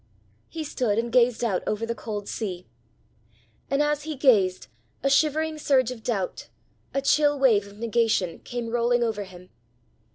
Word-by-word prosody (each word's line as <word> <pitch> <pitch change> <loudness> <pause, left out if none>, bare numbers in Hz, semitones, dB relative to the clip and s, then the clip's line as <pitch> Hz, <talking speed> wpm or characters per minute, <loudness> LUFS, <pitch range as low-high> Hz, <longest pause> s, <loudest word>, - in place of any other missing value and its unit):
He 325 -1 -5
stood 245 -7 -1
and 235 +1 -1
gazed 245 -1 +3
out 200 -6 0
over 215 +2 -1
the 235 - -2
cold 210 -3 -6
sea. 185 -5 -4 1.0
And 275 +2 +2
as 295 0 0
he 310 0 -5
gazed, 205 - +3 0.4
a 275 - +2
shivering 310 +2 +2
surge 260 -4 +2
of 245 -3 -8
doubt, 200 -6 -3 0.4
a 275 - -2
chill 290 +1 +3
wave 225 -7 +3
of 200 0 -14
negation, 225 -6 0
came 240 -1 -5
rolling 240 0 +2
over 215 -3 -2
him. 180 -1 -14
235 Hz, 160 wpm, -25 LUFS, 210-275 Hz, 1.0 s, gazed